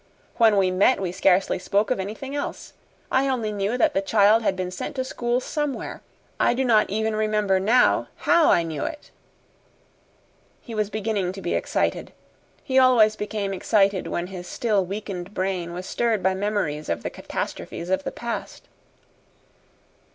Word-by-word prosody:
When 225 -3 +5
we 190 -2 +3
met 195 +8 +3
we 185 -3 -2
scarcely 185 +1 +2
spoke 200 +5 0
of 255 - 0
anything 220 +8 -5
else. 285 - -5 0.4
I 265 +1 +2
only 235 -5 -1
knew 205 +3 -1
that 245 - +3
the 195 - +1
child 210 +2 +4
had 200 -4 0
been 180 -1 -3
sent 185 - -6
to 260 - -1
school 240 -1 -1
somewhere. 295 +1 -4 0.4
I - - +3
do 265 +1 0
not 220 -3 +4
even 220 +2 -1
remember, 210 -3 +1
now, 230 +6 +3
HOW 340 -2 +3
I 170 - +4
knew 160 -3 -4
it." 300 -2 -6 1.5
He 235 - -10
was 215 -2 -1
beginning 210 -4 -2
to 195 - -8
be - - -1
excited. - - -1 0.5
He 265 -1 +3
always 235 -5 +5
became 210 -2 -3
excited 195 0 +1
when 175 - -2
his 180 -1 -8
still 210 -3 0
weakened 195 0 -6
brain 185 -2 -2
was 180 +2 -6
stirred 225 -3 0
by 190 0 +3
memories 190 -7 -2
of 85 - -2
the - - -3
catastrophes 175 +2 -5
of 190 0 +1
the - - -4
past. 235 -1 -6
205 Hz, 165 wpm, -24 LUFS, 190-230 Hz, 1.5 s, When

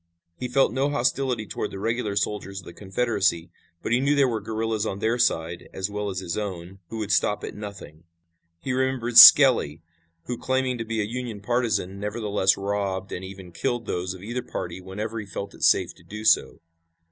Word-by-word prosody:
He 125 - -5
felt 135 +1 +2
no 135 +3 +1
hostility 125 -3 0
toward - - -4
the - - -8
regular 110 0 -2
soldiers 100 -1 -2
of 90 - -13
the - - -10
Confederacy, 95 -4 -1 0.3
but - - -3
he 120 - +3
knew 140 +2 +2
there 140 -2 +4
were 115 -3 -2
guerillas 110 -1 -2
on 105 -3 -3
their 115 +4 0
side, 85 -7 0
as 95 +2 -3
well 105 0 -3
as 95 - -5
his 85 -2 -4
own, 95 -2 -6
who 115 - -6
would 105 -2 -3
stop 105 +2 +1
at - - -5
nothing. 100 -7 -10 0.5
He 125 +9 -3
remembered 130 -2 +3
Skelly, 115 - +8 0.4
who, 125 +4 -5
claiming 130 -1 -1
to 115 - -3
be 110 0 -2
a - - -1
Union 120 -1 -5
partisan, 110 -4 -1
nevertheless 105 -2 0
robbed 100 -1 -3
and 90 - -5
even 95 -1 -10
killed 120 +4 -2
those 90 0 -3
of 95 - -12
either 120 +4 -3
party 95 -7 -6
whenever 105 +5 -5
he 105 - -6
felt 100 +1 -6
it - - -15
safe - - +3
to - - -21
do 105 +1 -8
so. - - +3
105 Hz, 200 wpm, -25 LUFS, 95-120 Hz, 0.5 s, Skelly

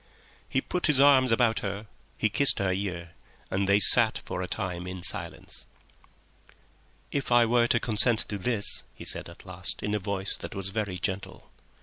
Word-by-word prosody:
He 135 - 0
put 180 - -1
his 150 -4 +3
arms 135 -3 +5
about 115 -1 +2
her, 100 +1 -5 0.3
he - - +1
kissed 140 +5 +3
her 95 -1 0
ear, 90 -3 -5 0.4
and 100 0 -1
they 100 +1 +4
sat - - +6
for 90 - -5
a 90 - -4
time 90 -3 -5
in 90 -1 -7
silence. - - -2 1.4
"If 140 -3 -3
I 120 -1 +5
were 120 +1 +2
to 120 - +2
consent 115 +1 +2
to 105 - -4
this?" 105 +1 +2
he - - -11
said - - -2
at 85 - -15
last, 95 -1 -5
in 105 0 -2
a 105 - 0
voice 95 0 -3
that - - -9
was 95 0 -3
very 100 -2 -4
gentle. 95 +2 -5
100 Hz, 185 wpm, -27 LUFS, 95-120 Hz, 1.4 s, sat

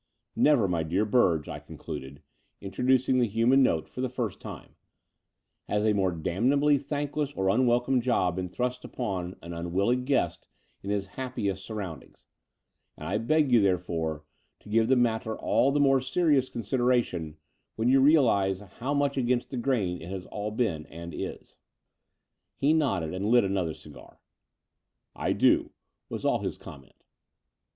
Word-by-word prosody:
"Never, 140 -9 +4
my 85 -3 0
dear 90 +7 0
Surge," 85 -11 +3
I - - -6
concluded, 65 +2 -9 0.4
intro 95 +4 -6
ducing 130 0 +3
the 120 -3 +2
htunan 115 +5 +3
note 80 -12 +2
for 125 - -7
the 130 - -1
first 120 -5 -4
time, - - -9 0.9
"has 105 +1 0
a 110 - +3
more 95 -2 +1
damnably 130 - +2
thankless 145 +1 -3
or 95 0 0
unwelcome 125 +3 +2
job 105 -8 +1
been 90 -1 -3
thrust 125 +5 -3
upon 95 -7 -4
an 85 0 -7
unwilling 95 +9 0
guest 140 +1 0 0.3
in 100 - -7
his 100 -1 -1
happiest 100 -2 -4
surroundings: 100 -7 -8 0.7
and - - -7
I 105 - 0
beg 145 +4 +2
you, 120 -3 +6
therefore, 85 -5 -1 0.4
to - - -15
give 110 +1 +3
the 130 - +4
matter 110 -2 0
all 135 - +2
the 145 - +1
more 135 -2 +4
serious 135 -1 +2
consideration 115 - -1 0.4
when 110 +2 0
you 135 +2 +5
realize 120 - +4
how 115 +8 -4
much 140 -1 0
against 125 -1 0
the 130 - -4
grain 115 -9 -1
it 90 +2 -6
all 105 0 -3
has 110 - -9
been 80 -11 -1
and 85 0 -9
is." - - -7 1.0
He 145 +3 +3
nodded 100 - 0
and 95 +3 -2
lit 120 +1 +5
another 95 -4 -1
dgar. 70 -5 -14 1.0
"I - - 0
do," - - +3 0.4
was - - -5
all - - +2
his - - -4
comment. 70 -2 -14
110 Hz, 160 wpm, -28 LUFS, 90-130 Hz, 1.0 s, you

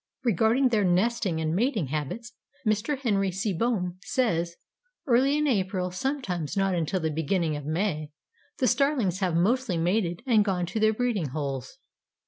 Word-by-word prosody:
Regarding 235 +4 +3
their 220 -4 +2
nesting 190 -1 +1
and 160 0 -1
mating 215 - 0
habits 155 - -4 0.3
Mr. 215 +7 +1
Henry 205 -7 +1
Seebohm 185 -1 -1
says: 175 -8 0 0.5
"Early 270 +2 +3
in 300 - +1
April, 190 -7 0
sometimes 200 - -3
not 195 -1 +2
until 175 +2 0
the 160 -2 -1
beginning 160 +1 0
of 145 -1 -6
May, 155 -2 -1 0.5
the 260 - +1
Starlings 255 - +2
have 185 -4 0
mostly 210 +2 +1
mated 175 +2 0
and 225 -5 +4
gone 185 -3 0
to 200 +6 -3
their 220 0 +4
breeding 220 -7 -1
holes. 135 - -4
195 Hz, 150 wpm, -27 LUFS, 170-235 Hz, 0.5 s, and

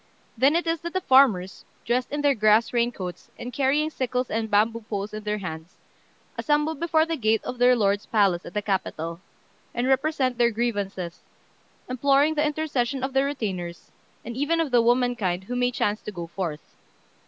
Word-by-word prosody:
Then 270 +6 +3
it 345 - +1
is 330 -1 -1
that 340 0 -6
the 375 - 0
farmers, 235 - +3 0.2
dressed 245 +2 0
in 290 0 -2
their 285 -1 +4
grass 215 0 +3
rain 240 0 +2
coats, 180 -5 -7
and 245 +1 -7
carrying 285 +4 +1
sickles 250 -2 -2
and 220 0 -1
bamboo 220 +3 +2
poles 205 0 -3
in 215 - -5
their 210 0 -1
hands, 160 -3 -7 0.6
assemble 300 +1 +1
before 320 0 +1
the 330 0 -2
gate 220 -5 +1
of 250 - -6
their 250 0 +6
lord's 200 -2 +1
palace 195 -5 +2
at - - -11
the 210 - -1
capital, 170 -4 -3 0.5
and 240 +1 0
represent 265 -2 +1
their 235 -1 +5
grievances, 205 -6 -3 0.7
imploring 275 +4 +3
the 300 -1 +1
intercession 285 -4 -1
of 265 0 -2
the 270 0 +3
retainers, 190 -11 -4 0.3
and 235 +1 -6
even 290 +5 0
of 320 -4 0
the 240 -1 +5
womankind 235 -7 +1
who 245 +6 -5
may 245 0 +2
chance 215 -3 -1
to - - -6
go 175 -4 -6
forth. 165 -3 -6
240 Hz, 185 wpm, -25 LUFS, 205-275 Hz, 0.7 s, their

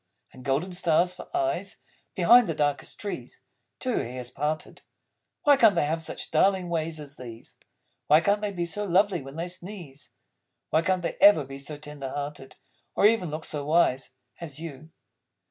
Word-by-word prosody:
And 130 - -13
golden 145 +8 0
stars, 175 0 +2
for 180 - -11
eyes, 340 -1 -2 0.4
Behind 240 -2 +6
the 165 - -2
darkest 145 -1 -1
trees 205 - -6 0.4
(Till 255 -3 -1
your - - -1
hair's 125 0 -6
parted)! 150 +4 -3 0.6
Why 290 -1 +6
can't 225 -6 +6
they - - +2
have 160 +2 -1
such 160 - -6
darling 185 +2 +2
ways 160 -1 -2
as 145 -1 -10
these? 115 -3 -11 0.5
Why 150 +1 +7
can't 200 +5 +1
they 210 -1 -1
be 175 -3 -2
so 205 +5 -1
lovely 190 -2 +2
when 135 +1 -10
they 165 +2 -3
sneeze? 175 -6 -8 0.6
Why 160 - +4
can't 185 +1 0
they - - -3
ever 200 -7 +7
be 135 +1 -9
so 145 +2 -6
tender 145 -2 -7
hearted, 145 -1 -6 0.4
Or - - +3
even 210 -5 +3
look 155 +1 -5
so 150 -2 -3
wise 140 -4 +1 0.2
As 155 -4 -7
You? 155 -2 -8
160 Hz, 180 wpm, -26 LUFS, 145-190 Hz, 0.6 s, Why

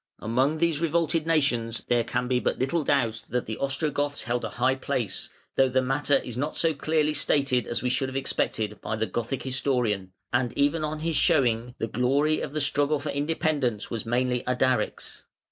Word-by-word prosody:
] - - -49
Among 130 +7 +1
these 165 -2 +1
revolted 165 0 +1
nations 120 -8 +1
there 120 -1 +3
can 125 +2 -2
be 125 0 +2
but - - -1
little 150 +5 0
doubt 115 -6 +1
that 125 0 -1
the 110 - -5
Ostrogoths 145 +1 -1
held 120 +1 -1
a - - -2
high 130 +2 +1
place, 130 -7 -3 0.3
though 135 -1 +5
the 130 +1 +2
matter 140 +2 +2
is 125 -3 -6
not 145 +5 -2
so 165 -1 +2
clearly 155 +1 +1
stated 135 -5 +1
as 120 - -2
we 125 - +1
should 130 +1 0
have 130 - -9
expected, 110 -5 -1
by 110 - -2
the 110 +1 0
Gothic 120 +6 -3
historian, 125 -8 0 0.2
and 125 -1 0
even 145 +3 +2
on 155 0 -3
his 165 -2 0
showing 120 -3 +2
the - - -1
glory 135 +7 +1
of 140 - -5
the 155 - 0
struggle 145 +1 +2
for 145 +1 -3
independence 145 -6 -1
was 115 - -3
mainly 125 +1 0
Ardaric's. 125 -2 -1
130 Hz, 195 wpm, -26 LUFS, 120-145 Hz, 0.3 s, though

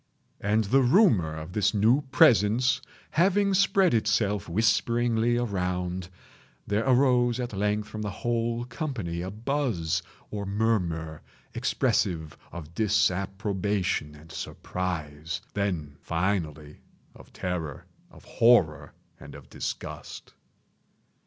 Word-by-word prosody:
And 105 +2 +1
the 130 +7 +3
rumor 120 - +4
of 80 +3 -8
this 105 +1 +1
new 115 +7 +4
presence 125 -1 +4 0.3
having 195 +3 +3
spread 195 -2 +3
itself 105 -3 +1
whisperingly 115 +4 +2
around, 90 -5 -2 0.6
there 105 +2 0
arose 125 -2 +3
at 120 -3 -4
length 105 +1 -1
from 110 0 -6
the 105 - -2
whole 115 +2 -2
company 115 - -4
a 90 - -4
buzz, 110 - -1 0.3
or 105 -1 -3
murmur, 90 -7 -1 0.3
expressive 80 -5 0 0.2
of 80 -2 -9
disapprobation 100 -4 0
and 80 +3 -15
surprise—then, 85 -1 -4
finally, 80 -4 -2 0.4
of - - -16
terror, 85 -6 -4 0.2
of - - -17
horror, 115 -10 +3 0.3
and 70 -1 -11
of 70 -2 -14
disgust. - - -6
105 Hz, 105 wpm, -27 LUFS, 85-120 Hz, 0.6 s, rumor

